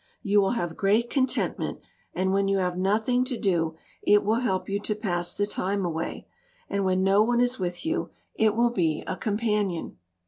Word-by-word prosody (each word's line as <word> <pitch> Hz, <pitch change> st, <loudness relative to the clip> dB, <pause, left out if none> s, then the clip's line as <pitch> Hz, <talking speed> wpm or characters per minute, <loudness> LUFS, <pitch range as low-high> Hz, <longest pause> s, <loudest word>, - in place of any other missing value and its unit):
You 205 Hz, -1 st, +4 dB
will 195 Hz, +4 st, +1 dB
have 175 Hz, -4 st, -3 dB
great 215 Hz, +4 st, +2 dB
contentment, 265 Hz, -2 st, 0 dB, 0.4 s
and 190 Hz, +1 st, +1 dB
when 195 Hz, 0 st, +2 dB
you 195 Hz, 0 st, +2 dB
have 180 Hz, -2 st, 0 dB
nothing 215 Hz, +7 st, +1 dB
to 255 Hz, -2 st, -2 dB
do 165 Hz, -6 st, 0 dB, 0.3 s
it 205 Hz, 0 st, +4 dB
will 220 Hz, +3 st, +2 dB
help 190 Hz, -7 st, -1 dB
you 200 Hz, +1 st, -1 dB
to 210 Hz, +1 st, -2 dB
pass 175 Hz, -5 st, -2 dB
the 205 Hz, -, +2 dB
time 200 Hz, -1 st, -1 dB
away, 165 Hz, -1 st, -4 dB, 0.4 s
and 200 Hz, 0 st, -1 dB
when 185 Hz, 0 st, +1 dB
no 195 Hz, +2 st, +4 dB
one 240 Hz, +2 st, +2 dB
is 245 Hz, 0 st, +1 dB
with 180 Hz, -, -3 dB
you 325 Hz, +2 st, -1 dB, 0.2 s
it 215 Hz, -1 st, +2 dB
will 240 Hz, +1 st, +3 dB
be 165 Hz, -8 st, 0 dB
a -, -, -3 dB
companion. 210 Hz, -5 st, -1 dB
200 Hz, 195 wpm, -26 LUFS, 185-225 Hz, 0.4 s, You